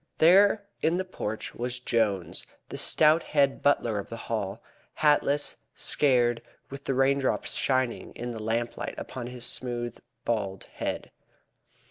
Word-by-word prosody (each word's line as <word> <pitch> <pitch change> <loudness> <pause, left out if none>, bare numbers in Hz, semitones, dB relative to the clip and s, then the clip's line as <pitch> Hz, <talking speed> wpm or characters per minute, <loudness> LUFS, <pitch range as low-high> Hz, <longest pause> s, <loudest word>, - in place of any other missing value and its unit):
There 200 +5 +6 0.2
in 165 +2 +2
the 185 - -1
porch 110 - -4
was 125 +1 -2
Jones, 105 -8 0 0.3
the - - -5
stout 155 +1 +5
head 140 -3 +1
butler 120 -7 +2
of 100 - -7
the 115 - -6
Hall, 105 -3 -3 0.4
hatless, 145 -1 +2 0.2
scared, 120 -4 +2 0.3
with 140 0 -8
the 135 - 0
raindrops 135 0 +2
shining 130 -3 0
in 120 +1 -5
the 110 -2 -6
lamplight 115 +2 -2
upon 125 -2 -6
his 125 0 -6
smooth, 120 -2 -3 0.3
bald 100 -5 -1
head. - - -4
125 Hz, 135 wpm, -28 LUFS, 115-145 Hz, 0.4 s, There